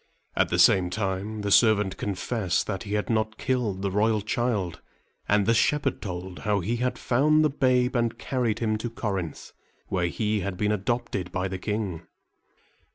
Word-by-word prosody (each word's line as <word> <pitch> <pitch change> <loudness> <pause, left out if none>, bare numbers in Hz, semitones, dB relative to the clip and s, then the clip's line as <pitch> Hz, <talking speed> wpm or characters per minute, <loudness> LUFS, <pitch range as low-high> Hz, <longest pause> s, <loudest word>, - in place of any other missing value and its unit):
At - - +2
the - - 0
same 90 -2 +5
time, 100 +2 -3
the 100 0 -2
servant 105 -3 +4
confessed 100 -2 -1
that 95 -3 -3
he 105 0 -3
had 105 - -1
not 110 -1 0
killed 115 -7 -1
the 100 - 0
royal 105 +2 +2
child; 105 -5 -1 0.5
and 105 -1 +3
the 115 - +4
shepherd 140 +3 +1
told 90 -2 -6
how 105 -1 +1
he 110 +7 -1
had 125 +1 -1
found 155 +5 +3
the 150 - +2
babe 130 -2 +2
and 120 -1 0
carried 125 -5 -1
him 110 -2 0
to 120 - -3
Corinth, 95 -8 -4 0.4
where 90 -2 0
he 105 +4 -1
had 95 -1 -4
been 105 +1 +1
adopted 105 -3 -2
by 95 +1 -1
the 95 0 -5
king. 105 -5 -3
105 Hz, 175 wpm, -26 LUFS, 95-120 Hz, 0.5 s, same